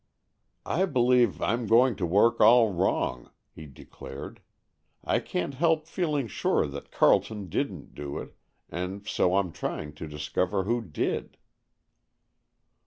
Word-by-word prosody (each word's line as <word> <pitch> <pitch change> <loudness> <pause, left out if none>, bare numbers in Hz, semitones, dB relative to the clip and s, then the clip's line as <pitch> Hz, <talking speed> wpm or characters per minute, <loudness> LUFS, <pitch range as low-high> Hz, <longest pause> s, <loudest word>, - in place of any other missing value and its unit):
"I 185 +5 +1
believe 125 - +2
I'm 115 -1 0
going 120 +2 +4
to 90 - -1
work 100 +7 +3
all 115 -3 +6
wrong," 85 -8 -1 0.2
he 80 - -11
declared. 70 0 -10 0.6
"I - - +1
can't 90 +10 -3
help 155 +2 +1
feeling 155 -5 -1
sure - - 0
that 70 -1 -8
Carleton 105 -4 +2
didn't - - -3
do 70 -1 -6
it, - - -8 0.3
and 95 +4 -5
so 90 +1 +2
I'm 95 -3 0
trying 75 -1 -5
to 75 +2 -8
discover 75 +5 -1
who 120 +4 0
did." 85 -10 -3
100 Hz, 130 wpm, -27 LUFS, 80-125 Hz, 0.6 s, all